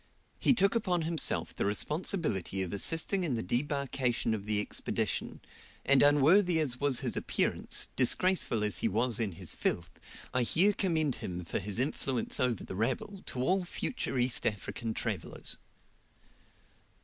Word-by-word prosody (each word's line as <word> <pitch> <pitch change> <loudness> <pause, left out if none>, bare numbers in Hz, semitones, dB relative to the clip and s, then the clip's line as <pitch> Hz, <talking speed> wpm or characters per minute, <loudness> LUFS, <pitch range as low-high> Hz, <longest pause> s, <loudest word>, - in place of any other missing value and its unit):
He 265 - +4
took 195 -2 +4
upon 185 -7 0
himself 160 -2 -1
the - - -2
responsibility 105 - 0
of 90 - -5
assisting 165 - +1
in 145 -8 0
the 115 - -2
debarkation 130 0 0
of 105 -2 -4
the 105 -1 +2
Expedition, 105 - -2 0.4
and 140 -1 +5
unworthy 160 +5 +5
as 130 -5 +2
was 140 -3 +1
his - - -2
appearance, - - 0
disgraceful 130 - +1
as 105 -1 +1
he - - +1
was 115 +2 +1
in 105 -5 -1
his - - -4
filth, 85 0 -2 0.4
I 125 - +2
here 180 - +3
commend 160 -8 0
him 90 -1 -6
for - - -2
his 105 0 -3
influence 130 -2 -1
over 125 -4 0
the - - -7
rabble 130 - -2
to 125 - -3
all 185 +7 +2
future 175 - -3
East 125 0 +2
African 110 +2 -4
travellers. - - -4
130 Hz, 150 wpm, -30 LUFS, 110-165 Hz, 0.4 s, and